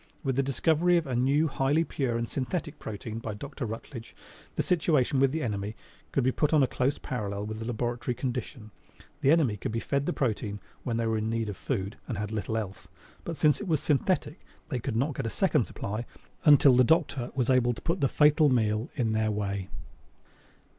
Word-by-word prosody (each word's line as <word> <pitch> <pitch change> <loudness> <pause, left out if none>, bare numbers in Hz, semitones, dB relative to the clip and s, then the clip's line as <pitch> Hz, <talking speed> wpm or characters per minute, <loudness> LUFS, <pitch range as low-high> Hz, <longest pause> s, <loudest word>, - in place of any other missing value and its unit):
With 135 -3 0
the 135 - +3
discovery 160 +6 +2
of 170 - 0
a 130 -3 -2
new, 140 +6 +3
highly 140 +3 +1
pure 130 -7 -1
and 115 0 -2
synthetic 150 +5 -3
protein 110 +1 -6
by 110 -2 -5
Dr. 140 +2 -6
Rutledge 115 +2 -8 0.4
the - - 0
situation 150 -6 +2
with 135 -1 +4
the 160 +1 -2
enemy 105 -2 -3 0.4
could 135 - +1
be 130 - +3
put 150 +4 +1
on 145 - +5
a - - +3
close 130 +3 0
parallel 100 -4 -4
with 110 +1 -5
the 110 - -5
laboratory 120 +1 -2
condition. 120 -3 -4 0.5
The 140 - +3
enemy 145 -9 +4
could 100 - -4
be 115 - -1
fed 140 +3 -1
the - - +2
protein 110 -7 -2 0.2
when 115 -2 -2
they 115 - 0
were 110 -1 +1
in 110 +1 -2
need 115 -1 -1
of 100 - -4
food 100 -2 -3
and 115 - -3
had 105 +1 -3
little 110 +1 -2
else, 100 -3 -5 0.4
but 165 -2 -5
since 150 -1 +3
it 205 - -5
was 160 -4 +2
synthetic, 155 +4 0 0.3
they 130 -6 -1
could 110 - -3
not 140 +6 +1
get 115 - -3
a - - -1
second 155 - +2
supply 105 +4 -5 0.4
until 145 -3 +7
the 125 - +6
Doctor 145 -4 +2
was 130 -1 +1
able 120 -1 +3
to 120 - -10
put 170 +3 -1
the 135 - +4
fatal 150 +2 +4
meal 110 -2 +1
in 120 -6 0
their 110 0 +1
way. 100 -2 -2
125 Hz, 210 wpm, -28 LUFS, 110-145 Hz, 0.5 s, until